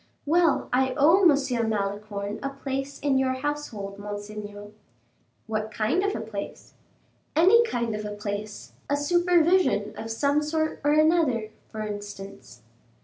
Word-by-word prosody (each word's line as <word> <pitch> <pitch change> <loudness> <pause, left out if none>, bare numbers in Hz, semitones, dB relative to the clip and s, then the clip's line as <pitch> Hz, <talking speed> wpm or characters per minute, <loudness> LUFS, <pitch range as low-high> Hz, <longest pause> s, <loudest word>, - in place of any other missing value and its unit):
"Well, 330 0 +3
I 260 0 +2
owe 325 +7 +5
M. 275 - +3
Malicorne 205 0 -3
a 275 - -2
place 275 0 -4
in 275 -2 +2
your 260 -1 +1
household, 260 -8 -4
monseigneur." 205 0 -7 0.7
"What 215 -1 -2
kind 220 - +1
of 405 - 0
a - - -3
place?" 215 -2 -7 0.6
"Any 380 +9 +6
kind 235 - -2
of 210 0 -4
a 210 0 -5
place; 205 0 -6 0.2
a 285 - +2
supervision 345 - +3
of 225 - -6
some 280 +6 +1
sort 315 +1 -1
or 290 0 +3
another, 305 -8 +3 0.2
for 215 - -7
instance." 205 - -8
245 Hz, 140 wpm, -26 LUFS, 210-295 Hz, 0.7 s, Any